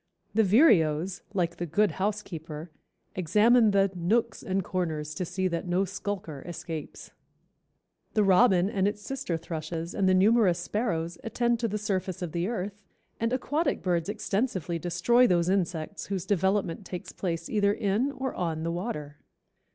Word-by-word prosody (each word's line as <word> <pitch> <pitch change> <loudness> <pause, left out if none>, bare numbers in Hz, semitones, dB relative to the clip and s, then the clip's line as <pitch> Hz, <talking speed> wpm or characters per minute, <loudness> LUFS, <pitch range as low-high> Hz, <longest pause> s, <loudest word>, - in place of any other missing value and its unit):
The 220 +1 +4
vireos, 185 - +4
like 175 -4 -1
the 175 - -3
good 205 +6 +2
housekeeper, 170 -6 -4 0.4
examine 215 +6 +4
the 195 -1 +3
"nooks 220 +6 0
and 190 0 -1
corners 160 -5 -2
to 180 +2 -3
see 185 +2 -1
that 170 +1 -3
no 180 +2 +2
skulker 190 -6 -5
escapes." 165 -3 -7 1.0
The 215 - +4
robin 190 -1 +5
and 200 -1 +1
its 205 0 -3
sister 240 -11 -3
thrushes 165 +1 -5
and 190 -2 +2
the 185 - +4
numerous 200 -2 +4
sparrows 175 -3 -2
attend 235 +1 0
to 230 - 0
the 210 0 -2
surface 190 -3 -2
of 170 - -4
the 170 +2 -1
earth, 205 -2 -4 0.4
and 230 +1 0
aquatic 290 +6 0
birds 175 -1 0
extensively 195 - -1
destroy 180 +9 +3
those 175 -3 +2
insects 175 -4 -1
whose 190 -3 -3
development 190 -1 0
takes 180 0 -7
place 165 -3 -3
either 205 -2 +2
in 210 +7 0
or 265 -2 -3
on 160 -3 -2
the 165 - -1
water. 150 -6 -4
185 Hz, 155 wpm, -28 LUFS, 170-210 Hz, 1.0 s, robin